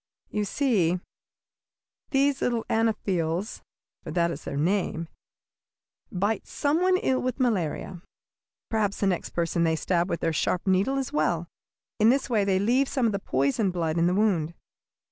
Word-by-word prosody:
"You 210 -1 -1
see, 195 - +1 1.1
these 275 -1 +2
little 235 -2 0
Anopheles, 195 -4 0 0.4
for - - -8
that 170 -1 +1
is 150 - -7
their 140 - -4
name, 170 0 0 1.0
bite 205 +4 -1
some 295 +4 0
one 370 0 +4
ill 260 -8 0
with 255 +1 -2
malaria. 185 - -1 0.7
Perhaps 210 -3 0
the - - +2
next 185 -3 0
person 170 0 0
they 160 -1 +2
stab 175 +2 0
with 170 - -2
their 165 - 0
sharp 175 +3 0
needle 195 +8 +2
is 270 -2 -3
well. 160 +3 0 0.5
In 215 +1 +6
this 265 +1 +1
way 215 -3 +3
they 195 -1 +2
leave 245 +7 +2
some 260 -3 0
of 225 - +3
the 200 - -2
poisoned 140 - 0
blood 165 -2 -1
in 170 - +3
the 180 - +1
wound. 175 -6 +1
195 Hz, 165 wpm, -26 LUFS, 170-230 Hz, 1.1 s, In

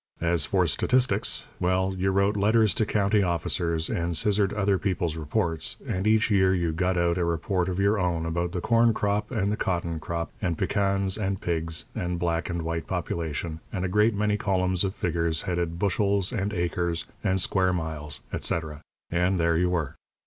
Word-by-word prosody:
As 85 0 +2
for 95 -2 +2
statistics 125 - +1
well, 95 +1 +1
you 95 +1 0
wrote 100 +2 +2
letters 110 +1 +3
to 110 - 0
county 105 0 +2
officers, 85 -2 0
and 85 -1 -1
scissored 105 -2 +2
other 100 -2 +1
people's 90 -5 -1
reports, 80 +1 -1
and 95 +3 -1
each 110 0 +3
year 95 -2 +4
you 85 -2 0
got 90 +3 0
out 85 0 +1
a - - +1
report 85 +2 0
of 90 - -3
your 100 +2 +3
own 85 -3 0
about 85 +1 -1
the 90 - -3
corn 115 +1 +3
crop 105 0 0
and 105 -5 0
the 105 - -1
cotton 85 -3 -1
crop 85 +1 -4
and 90 -5 -1
pecans 100 +1 0
and 95 -2 -1
pigs 80 -1 -2
and 90 0 -2
black 85 0 -1
and 85 -1 -2
white 80 0 -3
population, 80 0 -3
and 95 -2 -2
a - - +1
great 105 +4 +3
many 105 0 +1
columns 95 -2 +1
of 95 0 -2
figures 85 -2 -1
headed 85 -3 -2
"bushels" 100 0 +1
and 105 -2 -1
"acres" 85 -2 -1 0.2
and 95 -2 +1
"square 95 0 +2
miles," 75 -6 -3
etc. 80 -2 -2 0.3
and 90 +2 +1
there 85 0 +2
you 90 +2 +2
were. 85 -6 -1
90 Hz, 185 wpm, -26 LUFS, 85-100 Hz, 0.3 s, year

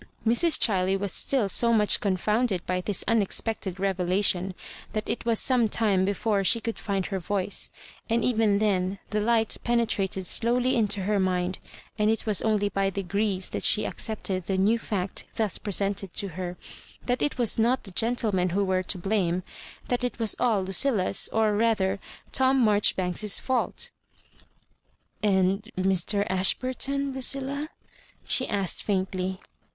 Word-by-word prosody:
Mr&, 240 +9 +4
Ghiley 195 -2 +2
was 200 -1 0
still 260 -7 +2
so 235 +4 +3
much 210 -2 +3
confounded 205 +1 0
by 180 0 -1
this 200 0 +1
unexpected 210 -3 0
revelation 185 0 0 0.4
that 215 -1 -3
it - - -3
was 230 -1 +2
some 245 -4 +1
time 200 -4 +1
before 200 +1 0
she 230 +5 +4
could 230 0 -5
find 195 -3 -2
her 195 - -3
voice; 195 +2 -1 0.4
and 230 0 +1
even 220 -4 +2
then 195 -2 0
the 210 - 0
light 225 0 +1
penetrated 205 -6 0
slowly 245 +6 +2
into 205 -4 0
her 205 +1 0
mind, 185 -1 -1 0.4
and 210 0 +2
it 225 +2 0
was 210 -3 +2
only 210 -2 +1
by 195 0 -1
degrees 195 0 -1
t^t - - -4
she 210 - +3
ac - - -4
cepted 190 -5 -2
the 195 - -1
new 210 +5 +2
fact 195 -4 -3
thus 215 -4 -1
presented 200 -2 -1
to 200 - -2
her; 180 +1 -6 0.5
that 245 0 -1
it 295 - -1
was 235 -2 +2
not 240 +4 +2
the 195 - -5
gentlemen 215 -4 +1
who 200 +3 0
were 185 -1 0
to 185 +1 -3
blsune— 185 -2 -1 0.4
that 245 0 -1
it 245 - -2
was 225 -3 +1
all 220 -6 +1
LuciUa'fi 190 +1 +2
or 220 -2 +1
rather 205 -3 +1 0.3
Tom 265 -1 +3
Marjori 210 -1 +3
banks's 185 +3 +1
fault 260 - -1 1.3
"And 195 +1 +1
Mr. 190 +2 +1
Ashburton, 260 +8 0
Ludlla?*' 275 +2 +1 0.6
she 260 - +2
asked 200 -4 0
faintly. 190 -1 -2
205 Hz, 155 wpm, -26 LUFS, 190-230 Hz, 1.3 s, Mr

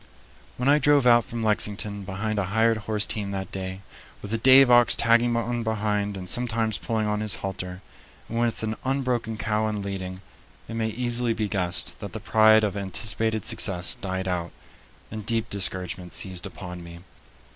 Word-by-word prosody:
When 125 - -1
I 145 +1 +5
drove 145 -3 +4
out 120 -1 +5
from 115 -1 -5
Lexington 105 -1 0
behind 105 +3 -3
a 100 - 0
hired 110 +3 +2
horse 105 -1 +3
team 105 -2 -2
that 95 -2 -5
day, 95 0 -5 0.4
with 105 - -6
the 115 - 0
Dave 130 +2 +7
ox 120 -1 +7
tagging 120 +1 +3
on 120 +1 -1
behind 105 -2 -1
and 90 -1 -7
sometimes 115 -1 -1
pulling 110 -2 -1
on 105 0 -1
his 105 -1 0
halter, 90 -1 -6 0.4
and 115 - -3
with 120 -1 0
an 110 0 -2
unbroken 125 -4 -1
cow 110 0 0
in 105 -2 -3
leading, 95 -2 -5 0.5
it 115 - -7
may 115 -1 -1
easily 120 +1 -1
be 110 -2 -1
guessed 90 -3 -2
that - - -7
the - - -5
pride 110 0 +5
of 105 -2 -1
anticipated 110 +2 -1
success 90 -3 0
died 95 -1 -4
out, 85 -2 -2 0.6
and 110 -1 -6
deep 115 +1 -2
discouragement 90 -3 -1
seized 90 +1 -3
upon 90 -2 -9
me. 85 0 -11
110 Hz, 180 wpm, -25 LUFS, 95-115 Hz, 0.6 s, Dave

